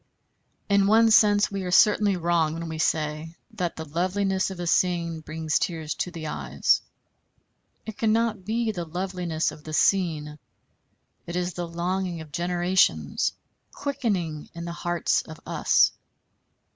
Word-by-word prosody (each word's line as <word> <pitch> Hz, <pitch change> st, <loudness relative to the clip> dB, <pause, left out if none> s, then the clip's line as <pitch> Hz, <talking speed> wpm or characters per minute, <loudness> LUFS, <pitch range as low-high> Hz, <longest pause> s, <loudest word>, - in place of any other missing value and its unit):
In 200 Hz, -1 st, +3 dB
one 225 Hz, +2 st, +5 dB
sense 205 Hz, -1 st, +5 dB
we 200 Hz, -1 st, -3 dB
are 180 Hz, -, -4 dB
certainly 205 Hz, +1 st, +4 dB
wrong 165 Hz, -2 st, +1 dB
when 165 Hz, 0 st, -5 dB
we 160 Hz, -1 st, -5 dB
say 155 Hz, +1 st, -1 dB, 0.2 s
that 175 Hz, -2 st, -3 dB
the 160 Hz, -, -6 dB
loveliness 185 Hz, +5 st, 0 dB
of 190 Hz, -2 st, -8 dB
a 175 Hz, -, -3 dB
scene 170 Hz, -1 st, +1 dB
brings 155 Hz, 0 st, -2 dB
tears 160 Hz, -3 st, -2 dB
to -, -, -3 dB
the 165 Hz, -3 st, -7 dB
eyes. 155 Hz, -, +1 dB, 1.0 s
It 220 Hz, -2 st, -8 dB
cannot 225 Hz, -2 st, +1 dB
be 225 Hz, +3 st, 0 dB
the 180 Hz, -5 st, -4 dB
loveliness 175 Hz, -1 st, -2 dB
of 150 Hz, -, -13 dB
the 155 Hz, -, -8 dB
scene; 155 Hz, -5 st, +1 dB, 0.9 s
it 170 Hz, -, -5 dB
is 180 Hz, 0 st, -1 dB
the 175 Hz, 0 st, -4 dB
longing 175 Hz, +1 st, -2 dB
of 155 Hz, -2 st, -10 dB
generations 175 Hz, -, +1 dB, 0.4 s
quickening 205 Hz, -, -2 dB
in 170 Hz, 0 st, -6 dB
the 170 Hz, -, -4 dB
hearts 175 Hz, 0 st, 0 dB
of 160 Hz, 0 st, -11 dB
us. -, -, +3 dB
175 Hz, 145 wpm, -25 LUFS, 160-195 Hz, 1.0 s, one